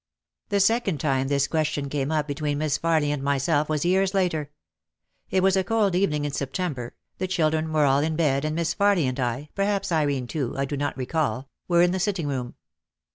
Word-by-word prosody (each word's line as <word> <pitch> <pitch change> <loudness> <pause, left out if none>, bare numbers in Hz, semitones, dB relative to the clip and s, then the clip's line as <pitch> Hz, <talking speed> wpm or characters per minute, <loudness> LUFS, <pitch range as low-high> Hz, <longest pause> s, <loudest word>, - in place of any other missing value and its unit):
The 200 -1 +1
second 195 -5 +2
time 135 -3 0
this 140 0 +1
question 155 -2 -1
came 140 +1 -2
up 155 -1 0
between 145 0 -2
Miss 150 -1 0
Farly 160 -3 +2
and 145 -2 -2
myself 140 +2 +1
was 155 0 0
years 190 +2 +2
later. 160 -6 0 0.8
It 185 -1 +1
was 195 0 +4
a 190 - +2
cold 210 -1 +1
evening 150 -6 +1
in 145 - -2
September, 135 -3 -3 0.2
the 185 - -1
children 160 -3 0
were 155 -2 +3
all 135 0 +4
in 155 +2 0
bed 145 -4 +1
and 155 0 -1
Miss 165 -1 0
Farly 200 -4 +3
and 130 0 -2
I, 125 +4 -2
perhaps 200 -1 -1
Irene 145 -5 +1
too, 130 0 -3
I 135 - 0
do 145 - -4
not 145 0 -2
recall, 130 -2 -2 0.2
were 175 -1 +4
in 175 - +3
the 190 - -1
sitting 180 -3 -1
room. 130 -3 -3
155 Hz, 205 wpm, -25 LUFS, 140-180 Hz, 0.8 s, was